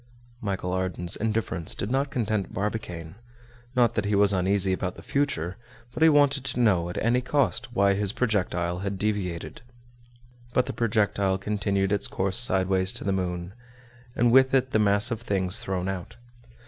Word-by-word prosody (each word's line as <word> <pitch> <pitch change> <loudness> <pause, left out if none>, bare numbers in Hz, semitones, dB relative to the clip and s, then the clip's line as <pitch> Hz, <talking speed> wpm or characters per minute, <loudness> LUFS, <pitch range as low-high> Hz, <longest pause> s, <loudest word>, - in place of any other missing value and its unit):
Michel 95 -3 -3
Ardan's 90 -2 -2
indifference 105 -6 -2
did 100 - -4
not 135 +2 +1
content 110 -6 -2
Barbicane. 95 -4 -4 0.6
Not 120 -2 +3
that 105 -3 -1
he 100 0 +1
was 100 0 +4
uneasy 95 +1 +1
about 90 -1 -3
the - - -12
future, 100 - -1 0.4
but - - -6
he 160 - +7
wanted 145 -2 +3
to 125 -2 -2
know 95 -8 +2
at 90 - -6
any 120 +2 +2
cost 130 -2 0
why 100 0 +4
his 100 0 -1
projectile 90 -7 -1
had 100 0 -3
deviated. 95 -5 -3 0.9
But 125 - +3
the - - -5
projectile 100 -4 +1
continued 100 -1 -1
its 100 - +1
course 95 +1 0
sideways 95 -4 +2
to - - -6
the 100 - 0
moon, 90 -1 -3 0.6
and 120 -1 +3
with 130 +1 +5
it 130 0 +1
the 110 - +2
mass 105 +3 +3
of 115 -1 -3
things 100 -2 +1
thrown 95 -5 -3
out. 95 +3 -5
100 Hz, 170 wpm, -26 LUFS, 95-115 Hz, 0.9 s, he